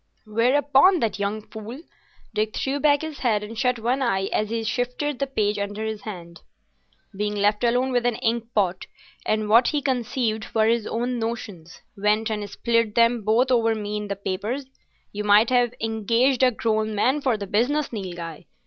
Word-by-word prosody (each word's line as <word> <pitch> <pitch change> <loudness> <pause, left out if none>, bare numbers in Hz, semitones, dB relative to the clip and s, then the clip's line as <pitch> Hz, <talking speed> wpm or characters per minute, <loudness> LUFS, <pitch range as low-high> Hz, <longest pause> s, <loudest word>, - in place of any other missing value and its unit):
"Whereupon 275 - +4
that 215 -3 -1
young 205 +2 -2
fool,"—Dick 220 -2 -7
threw 275 +1 -1
back 290 0 +3
his 315 -2 -6
head 215 -5 +1
and 215 +2 -8
shut 250 +1 +1
one 245 +4 -1
eye 195 -6 0
as 215 0 0
he 230 0 -2
shifted 250 +5 -2
the 275 - 0
page 210 -5 0
under 205 +2 -3
his 220 -1 -4
hand,—"being 200 +2 -9
left 205 +2 +1
alone 250 +2 +2
with 245 -1 +1
an 240 - 0
ink 235 -1 -1
pot 190 -3 0 0.4
and 215 0 0
what 230 +3 +5
he 295 - +1
conceived 245 -5 -2
were 220 -1 +4
his 230 -1 +1
own 245 +1 -2
notions, 210 -7 -6
went 210 +2 +1
and 210 -1 -3
spilt 230 0 0
them 235 0 +3
both 235 +5 +2
over 225 -2 +3
me 210 -1 -4
in 210 0 -3
the 200 - -3
papers. 200 +8 -3 0.5
You 210 +1 -4
might 210 +3 +5
have 245 -1 +2
engaged 230 +4 +1
a 260 - +6
grown 220 -2 -1
man 260 +8 +2
for 255 -5 +1
the 200 - -5
business, 245 +9 0
Nilghai. 175 -6 -6
225 Hz, 175 wpm, -24 LUFS, 210-250 Hz, 0.5 s, a